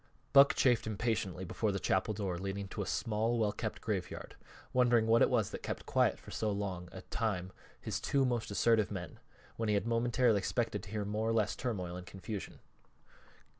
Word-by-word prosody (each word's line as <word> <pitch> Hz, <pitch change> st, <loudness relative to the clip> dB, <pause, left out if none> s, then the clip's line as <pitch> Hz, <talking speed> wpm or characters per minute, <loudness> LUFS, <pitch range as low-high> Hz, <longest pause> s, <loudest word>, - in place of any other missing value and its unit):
Buck 140 Hz, 0 st, +8 dB
chafed 120 Hz, -4 st, +3 dB
impatiently 105 Hz, -4 st, -1 dB
before 105 Hz, +4 st, -1 dB
the 100 Hz, -, -2 dB
chapel 95 Hz, +4 st, +1 dB
door 95 Hz, -4 st, -2 dB
leading 100 Hz, +1 st, -4 dB
to 105 Hz, -, -4 dB
a 100 Hz, -, -3 dB
small, 115 Hz, +1 st, 0 dB
well 110 Hz, -2 st, +2 dB
kept -, -, -4 dB
graveyard, -, -, -4 dB, 0.4 s
wondering 120 Hz, -3 st, +4 dB
what 115 Hz, +1 st, +4 dB
it -, -, +6 dB
was 115 Hz, -5 st, +1 dB
that -, -, -6 dB
kept -, -, -5 dB
quiet -, -, +2 dB
for -, -, -13 dB
so 110 Hz, -, -1 dB
long 95 Hz, -3 st, -3 dB
a -, -, -9 dB
time 95 Hz, -5 st, -2 dB, 0.3 s
his -, -, -3 dB
two 135 Hz, -1 st, +2 dB
most 120 Hz, -3 st, -1 dB
assertive 110 Hz, +1 st, +3 dB
men, 90 Hz, -4 st, -6 dB, 0.4 s
when 115 Hz, -1 st, -1 dB
he 105 Hz, -, +3 dB
had 100 Hz, -, 0 dB
momentarily 115 Hz, -1 st, +2 dB
expected 110 Hz, +1 st, -1 dB
to 105 Hz, -, -11 dB
hear 105 Hz, 0 st, -2 dB
more 105 Hz, +2 st, -1 dB
or -, -, +2 dB
less 110 Hz, -2 st, +1 dB
turmoil 95 Hz, -8 st, -3 dB
and 90 Hz, -, -9 dB
confusion. 95 Hz, +1 st, -6 dB
105 Hz, 195 wpm, -33 LUFS, 100-115 Hz, 0.4 s, Buck